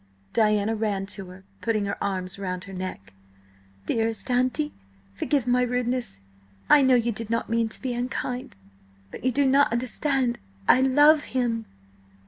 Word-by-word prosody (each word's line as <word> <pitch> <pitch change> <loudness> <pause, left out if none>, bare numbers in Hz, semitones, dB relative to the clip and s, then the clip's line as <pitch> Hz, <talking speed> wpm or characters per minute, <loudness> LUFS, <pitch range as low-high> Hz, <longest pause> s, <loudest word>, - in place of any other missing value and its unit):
Diana 215 -1 +2
ran 210 -3 -1
to 195 -2 -6
her, 185 +1 -13 0.2
putting 215 -3 0
her 200 - -3
arms 190 -1 -3
round 185 -2 -4
her 195 - -10
neck. 185 - -6 0.7
"Dearest 225 0 -1
auntie, 255 +5 +1 0.4
forgive 260 - 0
my 250 0 +3
rudeness! 245 - -1 0.5
I 295 - +8
know 260 -1 +5
you 235 -1 +2
did 225 0 -5
not 230 0 -1
mean 230 -1 +1
to - - -5
be 255 -2 -3
unkind! 250 +1 -4 0.6
But - - -9
you 255 - +2
do 280 +3 +2
not 275 0 +4
understand–I 240 - +1
love 290 +3 +5
him." 230 -3 -1
230 Hz, 150 wpm, -25 LUFS, 200-255 Hz, 0.7 s, I